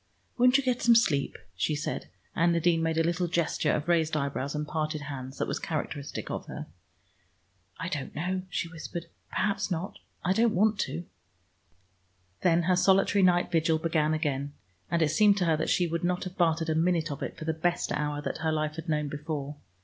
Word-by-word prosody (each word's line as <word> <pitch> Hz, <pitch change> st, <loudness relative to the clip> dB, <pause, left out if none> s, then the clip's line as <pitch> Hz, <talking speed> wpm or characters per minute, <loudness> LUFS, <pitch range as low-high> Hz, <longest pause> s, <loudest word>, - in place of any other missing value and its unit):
"Won't 250 Hz, +2 st, +5 dB
you 275 Hz, -, 0 dB
get 250 Hz, -1 st, 0 dB
some 235 Hz, -1 st, +6 dB
sleep?" 145 Hz, -12 st, +2 dB, 0.2 s
she 150 Hz, -, 0 dB
said, 145 Hz, -, -4 dB, 0.3 s
and 170 Hz, +1 st, +3 dB
Nadine 170 Hz, 0 st, +2 dB
made 165 Hz, 0 st, 0 dB
a 165 Hz, -, +4 dB
little 175 Hz, +2 st, 0 dB
gesture 170 Hz, -2 st, +1 dB
of 150 Hz, +1 st, -1 dB
raised 160 Hz, -3 st, +2 dB
eyebrows 140 Hz, 0 st, -2 dB
and 150 Hz, 0 st, -2 dB
parted 155 Hz, 0 st, -2 dB
hands 135 Hz, -2 st, -7 dB
that -, -, -1 dB
was -, -, -2 dB
characteristic 145 Hz, -3 st, -4 dB
of -, -, -4 dB
her. -, -, -6 dB, 1.1 s
"I 165 Hz, -, -3 dB
don't 150 Hz, -7 st, -4 dB
know," 185 Hz, +5 st, -1 dB
she 175 Hz, -, -2 dB
whispered. 165 Hz, +1 st, -7 dB, 0.2 s
"Perhaps 200 Hz, -1 st, 0 dB
not. 180 Hz, +1 st, -3 dB, 0.3 s
I 185 Hz, -, +3 dB
don't 225 Hz, 0 st, +3 dB
want 210 Hz, +2 st, +3 dB
to." 170 Hz, -, -4 dB, 1.4 s
Then 170 Hz, -1 st, +3 dB
her 180 Hz, +2 st, +3 dB
solitary 195 Hz, +2 st, +4 dB
night 180 Hz, -1 st, +3 dB
vigil 165 Hz, -1 st, +3 dB
began 155 Hz, -1 st, +1 dB
again, 145 Hz, -3 st, -2 dB, 0.4 s
and 170 Hz, -1 st, +2 dB
it 155 Hz, -, +2 dB
seemed 205 Hz, +4 st, +4 dB
to 180 Hz, -, +1 dB
her 165 Hz, -2 st, +3 dB
that 160 Hz, -, -1 dB
she 180 Hz, -, +3 dB
would 170 Hz, 0 st, -2 dB
not 180 Hz, 0 st, 0 dB
have 185 Hz, -1 st, -7 dB
bartered 165 Hz, -2 st, +1 dB
a -, -, +2 dB
minute 165 Hz, -1 st, +1 dB
of 140 Hz, -, -6 dB
it -, -, -4 dB
for 155 Hz, -, -7 dB
the 160 Hz, -, 0 dB
best 175 Hz, +2 st, -1 dB
hour 150 Hz, 0 st, -1 dB
that -, -, -3 dB
her 160 Hz, 0 st, 0 dB
life 155 Hz, 0 st, -1 dB
had 165 Hz, +1 st, -6 dB
known 150 Hz, -1 st, 0 dB
before. 145 Hz, 0 st, -5 dB
165 Hz, 205 wpm, -28 LUFS, 150-180 Hz, 1.4 s, some